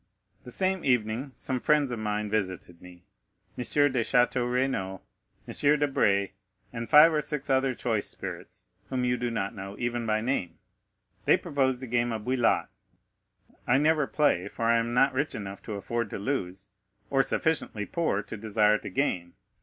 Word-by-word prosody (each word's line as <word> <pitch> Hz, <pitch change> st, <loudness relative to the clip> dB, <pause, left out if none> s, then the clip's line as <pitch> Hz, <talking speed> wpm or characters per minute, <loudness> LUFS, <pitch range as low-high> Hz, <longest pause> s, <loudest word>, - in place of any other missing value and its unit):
The 125 Hz, -, -9 dB
same 190 Hz, +4 st, +1 dB
evening 120 Hz, +1 st, 0 dB
some 130 Hz, +1 st, -2 dB
friends 145 Hz, -1 st, +2 dB
of 120 Hz, -, -3 dB
mine 105 Hz, 0 st, -2 dB
visited 95 Hz, -5 st, -3 dB
me,—M. 90 Hz, -1 st, -14 dB, 0.9 s
de 130 Hz, -3 st, +1 dB
Château 125 Hz, +1 st, +2 dB
Renaud, 110 Hz, -8 st, -1 dB, 0.5 s
M. 150 Hz, +1 st, +2 dB
Debray, 105 Hz, -9 st, +2 dB, 0.4 s
and 115 Hz, -1 st, -5 dB
five 155 Hz, +4 st, +8 dB
or 150 Hz, -, +2 dB
six 150 Hz, -1 st, -2 dB
other 130 Hz, -1 st, +2 dB
choice 115 Hz, -4 st, -1 dB
spirits, -, -, -7 dB, 0.2 s
whom 130 Hz, -1 st, -1 dB
you 125 Hz, 0 st, +2 dB
do 125 Hz, -1 st, -2 dB
not 105 Hz, -3 st, -2 dB
know, 100 Hz, -1 st, -7 dB
even 120 Hz, -1 st, -2 dB
by 110 Hz, 0 st, +2 dB
name. 115 Hz, -7 st, -2 dB, 0.7 s
They -, -, +5 dB
proposed 130 Hz, -2 st, -1 dB
a -, -, -5 dB
game 120 Hz, 0 st, 0 dB
of 110 Hz, -2 st, -4 dB
bouillotte. 125 Hz, -2 st, +1 dB, 1.0 s
I 125 Hz, -, +4 dB
never 150 Hz, 0 st, +2 dB
play, 145 Hz, -, +1 dB
for 115 Hz, -, -4 dB
I 115 Hz, 0 st, +4 dB
am 120 Hz, +1 st, -2 dB
not 135 Hz, +2 st, +4 dB
rich 145 Hz, +3 st, -1 dB
enough 100 Hz, -1 st, -7 dB
to 110 Hz, -, -5 dB
afford 115 Hz, +2 st, -3 dB
to -, -, -5 dB
lose, 95 Hz, -4 st, -3 dB, 0.4 s
or 135 Hz, -1 st, +4 dB
sufficiently 135 Hz, -9 st, -1 dB
poor 155 Hz, -, -1 dB
to 110 Hz, -, -8 dB
desire 105 Hz, 0 st, +2 dB
to 105 Hz, -, -7 dB
gain. 90 Hz, -7 st, -1 dB
120 Hz, 170 wpm, -28 LUFS, 105-135 Hz, 1.0 s, five